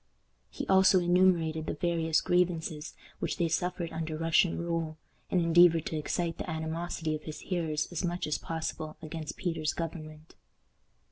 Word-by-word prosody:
He - - -5
also 190 0 +6
enumerated 175 -3 +3
the - - -2
various 165 -1 +1
grievances 165 -3 0 0.2
which - - -2
they 170 - +2
suffered 175 +1 -1
under 160 -1 -3
Russian 165 +2 +3
rule, 165 -2 -2 0.3
and 185 - +2
endeavored 170 -1 +5
to - - -3
excite 165 +2 -2
the - - -4
animosity 160 0 -3
of 155 - -4
his 155 - -7
hearers 160 -5 -1
as 175 - -3
much 175 0 -1
as 150 - -1
possible 160 -1 -4
against 155 0 -6
Peter's 165 -4 -1
government. 155 -2 -6
165 Hz, 150 wpm, -30 LUFS, 155-175 Hz, 0.3 s, also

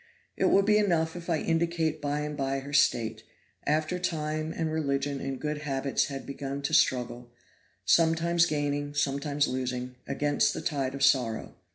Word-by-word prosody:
It - - +1
will 195 - +5
be 210 +1 +4
enough 165 -5 +1
if 175 0 -8
I 165 - +2
indicate 165 -1 0
by 145 0 -1
and 150 0 -4
by 135 -1 -1
her 140 +1 -9
state, 120 -5 +2 0.5
after 155 +4 +1
time 155 -2 -2
and 160 -1 -2
religion 140 -2 -1
and 135 -1 -4
good 150 0 -3
habits 140 -2 0
had 135 -1 -6
begun 140 0 -5
to 160 - -2
struggle, 125 -5 +2 0.6
sometimes 170 +1 +3
gaining, 145 -1 -2
sometimes 140 +1 0
losing, 125 -1 -3
against 145 +1 +1
the - - -4
tide 135 -3 -2
of 135 - -2
sorrow. 125 -5 +2
145 Hz, 165 wpm, -28 LUFS, 135-160 Hz, 0.6 s, will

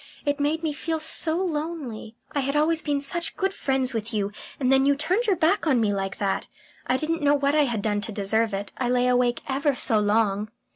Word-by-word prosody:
It 285 0 0
made 305 +3 0
me 310 -2 -1
feel 320 +2 -3
so 320 +1 +3
lonely. 300 -10 -4 0.2
I 285 - -1
had 275 +1 -1
always 315 +2 +2
been 290 -2 -1
such 340 +5 -1
good 385 0 0
friends 265 -6 -1
with 225 0 -3
you, 200 -1 -1 0.3
and 260 -2 +1
then 270 0 +5
you 285 - +4
turned 365 +11 0
your 400 - +3
back 340 +2 +1
on 265 -5 +3
me 210 -3 +1
like 195 -1 -3
that. 195 -1 -1 0.4
I 255 - +2
didn't 320 +3 -2
know 290 0 +4
what 280 0 +1
I 300 -1 +4
had 230 -6 -2
done 205 -1 0
to 220 - -5
deserve 220 +2 0
it. 195 0 -4
I 250 -2 0
lay 250 0 +2
awake 245 -1 +2
ever 280 +1 0
so 225 -3 +3
long." 210 0 +1
270 Hz, 230 wpm, -25 LUFS, 225-310 Hz, 0.4 s, then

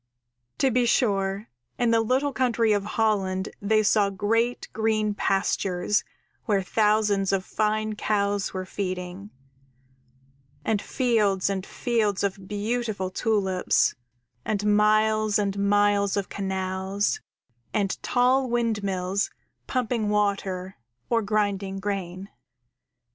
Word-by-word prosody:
_ 270 - +3
_To 260 - +1
be 245 -1 +3
sure, 200 -4 +1 0.3
in 240 -1 +2
the 230 0 +4
little 265 +5 +1
country 235 -3 +2
of 205 -1 0
Holland 200 -3 0
they 215 +1 +3
saw 205 -1 +3
great 225 +5 0
green 215 -1 +1
pastures 195 0 0 0.4
where 200 -4 +1
thousands 210 -1 +2
of 190 -1 0
fine 215 0 0
cows 205 -1 0
were 185 -1 -4
feeding, 185 0 -5 1.4
and 210 -2 +1
fields 210 -7 +1
and 190 -1 -2
fields 215 -4 -1
of 195 -1 -3
beautiful 210 -2 -2
tulips, 190 -3 +1 0.5
and 210 0 +1
miles 215 0 +3
and 200 -1 -1
miles 205 0 +2
of 200 - -2
canals, 190 - -2 0.5
and 200 -2 -1
tall 255 +1 +2
windmills 200 -5 0 0.4
pumping 235 -4 -1
water 195 -3 -1 0.3
or 230 -1 +3
grinding 200 -2 -1
grain. 190 -2 -4
205 Hz, 110 wpm, -25 LUFS, 195-220 Hz, 1.4 s, the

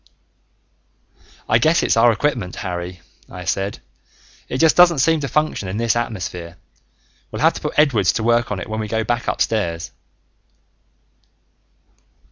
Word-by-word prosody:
"I 110 - +3
guess 160 +7 +3
it's - - +2
our 115 +1 +5
equipment, 115 -6 -2
Harry," 90 -1 -5 0.3
I 90 0 -9
said. 95 +2 -2 0.7
"It 130 - -2
just 160 +2 +4
doesn't 175 -2 +6
seem 160 +4 +3
to 140 - -3
function 155 -9 -1
in 95 +3 -4
this 115 -1 +1
atmosphere. 90 -7 -4 0.7
We'll - - -4
have - - +5
to - - -8
put - - -4
Edwards 120 - +4
to 110 - -2
work 120 0 +2
on 100 - -2
it - - -6
when 110 0 -4
we 110 - -3
go 110 +1 -1
back 120 +1 -2
upstairs." 85 -7 -1
110 Hz, 150 wpm, -20 LUFS, 95-130 Hz, 0.7 s, doesn't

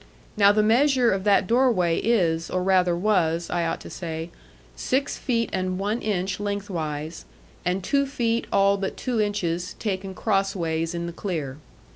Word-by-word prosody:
Now, 200 -2 +6
the 210 +1 +2
measure 250 +2 +4
of 190 +1 -1
that 200 -2 +4
doorway 225 -7 +2
is, 170 -8 +1
or 185 0 -1
rather 180 -2 +3
was, 170 -3 +1
I 170 -1 0
ought - - -2
to - - -9
say, 165 -1 -5 0.4
six 270 +2 -1
feet 230 -3 -1
and 185 -1 -1
one 210 +5 -1
inch 190 -3 -1
lengthwise, 170 -7 -4 0.4
and 180 +1 -1
two 280 +7 +1
feet 235 -4 -1
all 200 0 +4
but 195 -1 -4
two 245 -4 -1
inches 180 -4 -2
taken 190 -2 -3
crossways 175 -6 -1
in 170 0 -3
the 170 - -5
clear. 155 -8 -4
190 Hz, 160 wpm, -24 LUFS, 170-215 Hz, 0.4 s, Now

